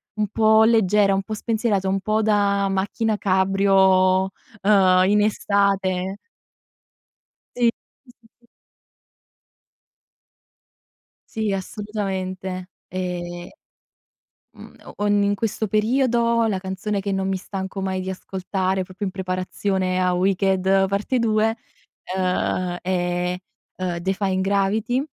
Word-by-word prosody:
un 215 Hz, -1 st, 0 dB
po' 220 Hz, 0 st, +4 dB
leggera, 210 Hz, -3 st, +3 dB
po' 215 Hz, -, -6 dB
spensierata, 215 Hz, -3 st, -1 dB
un 195 Hz, +1 st, +1 dB
po' 215 Hz, +2 st, +1 dB
da 200 Hz, -2 st, +2 dB
macchina 205 Hz, +3 st, -1 dB
cabrio, 190 Hz, -1 st, +3 dB, 0.3 s
uhm, 190 Hz, -3 st, +5 dB
in 210 Hz, +1 st, +4 dB
estate. 200 Hz, -2 st, 0 dB, 1.4 s
Sì. 240 Hz, -1 st, +3 dB, 0.3 s
Sì, 255 Hz, -, -18 dB
sì, 230 Hz, -, -24 dB
sì. 240 Hz, -, -29 dB, 2.9 s
Sì, 220 Hz, -2 st, -1 dB
assolutamente. 190 Hz, -2 st, -4 dB, 0.2 s
Ehm, 175 Hz, -1 st, -5 dB, 1.0 s
mhmm, -, -, -14 dB
o 205 Hz, -, -1 dB
in 205 Hz, 0 st, +2 dB
questo 220 Hz, +1 st, -2 dB
periodo 235 Hz, +2 st, +2 dB
la 205 Hz, -4 st, 0 dB
canzone 190 Hz, +2 st, -3 dB
che 200 Hz, 0 st, -3 dB
non 195 Hz, 0 st, -1 dB
mi 190 Hz, -1 st, -1 dB
stanco 190 Hz, 0 st, -6 dB
mai 190 Hz, -1 st, -2 dB
di 190 Hz, -, -4 dB
ascoltare, 190 Hz, 0 st, -2 dB
proprio 190 Hz, +3 st, -6 dB
in 190 Hz, -, -4 dB
preparazione 185 Hz, 0 st, -2 dB
a 180 Hz, 0 st, +2 dB
Wicked 190 Hz, +1 st, +2 dB
parte 200 Hz, +6 st, -1 dB
2, 225 Hz, -1 st, +1 dB, 0.6 s
uhm, 185 Hz, -1 st, -1 dB
è, 180 Hz, 0 st, -1 dB, 0.4 s
ehm, 180 Hz, -2 st, -3 dB
Defying 190 Hz, +1 st, -1 dB
Gravity, 200 Hz, +5 st, +1 dB
195 Hz, 110 wpm, -22 LUFS, 185-210 Hz, 2.9 s, uhm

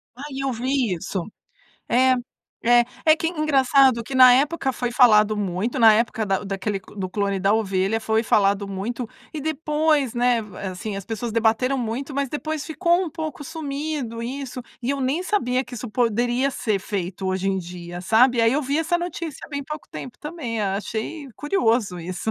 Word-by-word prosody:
Ai, 270 Hz, +1 st, -7 dB
eu 270 Hz, -, 0 dB
vi 250 Hz, -2 st, 0 dB
isso. 180 Hz, +3 st, -4 dB, 0.7 s
É. 255 Hz, +1 st, +4 dB, 0.5 s
É, 240 Hz, +1 st, +6 dB, 0.2 s
é 315 Hz, 0 st, +6 dB
que 325 Hz, -, -2 dB
é -, -, +1 dB
engraçado 275 Hz, -6 st, +3 dB
que 265 Hz, -, -7 dB
na 255 Hz, -1 st, +9 dB
época 280 Hz, 0 st, +1 dB
foi 245 Hz, -1 st, -3 dB
falado 215 Hz, -4 st, +5 dB
muito, 205 Hz, +5 st, -2 dB
na 225 Hz, -1 st, +8 dB
época 225 Hz, 0 st, 0 dB
da 195 Hz, -2 st, 0 dB
o -, -, -9 dB
daquele 195 Hz, +1 st, -2 dB
do 190 Hz, -1 st, -7 dB
clone 200 Hz, -1 st, -1 dB
da 195 Hz, +2 st, +3 dB
ovelha, 200 Hz, 0 st, +1 dB
foi 220 Hz, 0 st, +1 dB
falado 200 Hz, -2 st, +2 dB
muito 220 Hz, +5 st, -4 dB, 0.3 s
e 305 Hz, -, -3 dB
depois, 300 Hz, -3 st, +1 dB
né, 245 Hz, -1 st, +2 dB
va 210 Hz, -2 st, -11 dB
assim, 190 Hz, +3 st, -5 dB
as 195 Hz, -1 st, -5 dB
pessoas 225 Hz, +1 st, -4 dB
debateram 230 Hz, +4 st, +2 dB
muito 255 Hz, +4 st, -3 dB
mas 280 Hz, 0 st, 0 dB
depois 305 Hz, +2 st, -3 dB
ficou 345 Hz, +2 st, +1 dB
um 335 Hz, -, -5 dB
pouco 310 Hz, -4 st, -5 dB
sumido 285 Hz, -5 st, -4 dB
isso, 255 Hz, +1 st, -5 dB, 0.2 s
e 245 Hz, +1 st, -1 dB
eu 280 Hz, 0 st, -1 dB
nem 275 Hz, +7 st, 0 dB
sabia 260 Hz, -11 st, 0 dB
que 250 Hz, -, -10 dB
isso 240 Hz, 0 st, -6 dB
poderia 245 Hz, +3 st, +1 dB
ser 215 Hz, -5 st, -1 dB
feito 190 Hz, -1 st, -4 dB
hoje 190 Hz, +1 st, 0 dB
em 190 Hz, -1 st, 0 dB
dia, 175 Hz, 0 st, -7 dB
sabe, 235 Hz, +6 st, +4 dB
aí 230 Hz, 0 st, +4 dB
eu 295 Hz, +3 st, +1 dB
vi 280 Hz, +3 st, 0 dB
essa 335 Hz, +2 st, +1 dB
notícia 345 Hz, -4 st, -5 dB
bem 285 Hz, -1 st, -4 dB
pouco 300 Hz, +2 st, -7 dB
tempo 245 Hz, -1 st, -8 dB
também, 295 Hz, -8 st, -4 dB
a 195 Hz, -2 st, 0 dB
achei 225 Hz, +9 st, -5 dB
curioso 230 Hz, -, +1 dB
isso. 180 Hz, +5 st, -4 dB
245 Hz, 190 wpm, -23 LUFS, 210-280 Hz, 0.7 s, na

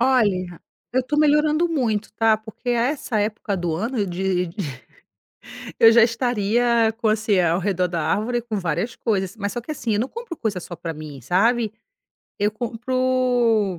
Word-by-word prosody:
Olha, 205 Hz, -9 st, +1 dB, 0.3 s
eu 260 Hz, +1 st, +2 dB
tô 280 Hz, +4 st, -2 dB
melhorando 300 Hz, +2 st, +3 dB
muito, 225 Hz, -9 st, -1 dB
tá, 220 Hz, 0 st, +3 dB
porque 220 Hz, +3 st, -10 dB
a 240 Hz, -1 st, +2 dB
essa 265 Hz, -6 st, -2 dB
época 210 Hz, -1 st, -1 dB
do 175 Hz, -2 st, -2 dB
ano, 220 Hz, +3 st, -1 dB
de 180 Hz, 0 st, -1 dB
de 165 Hz, -, -14 dB, 1.2 s
eu 225 Hz, -, +9 dB
já 230 Hz, 0 st, +6 dB
estaria 230 Hz, 0 st, +2 dB
com 230 Hz, -2 st, +1 dB
assim, 215 Hz, -2 st, +2 dB
ao 170 Hz, 0 st, +2 dB
redor 185 Hz, -1 st, 0 dB
da 170 Hz, -2 st, -2 dB
árvore 235 Hz, +7 st, 0 dB
com 225 Hz, -3 st, -3 dB
várias 175 Hz, +6 st, -2 dB
coisas. 195 Hz, -4 st, -1 dB
Mas 200 Hz, -2 st, -3 dB
só 240 Hz, -, -4 dB
que 275 Hz, -, -9 dB
assim, 240 Hz, -7 st, -2 dB
eu 205 Hz, -, +1 dB
não 250 Hz, -, -1 dB
compro 460 Hz, -4 st, -7 dB
coisa 210 Hz, -8 st, -2 dB
só 175 Hz, 0 st, -8 dB
pra 165 Hz, -1 st, -5 dB
mim, 150 Hz, -4 st, -9 dB
sabe. 220 Hz, -, +2 dB, 0.7 s
Eu 205 Hz, +1 st, +2 dB
compro 240 Hz, -3 st, +1 dB
220 Hz, 175 wpm, -22 LUFS, 190-245 Hz, 1.2 s, eu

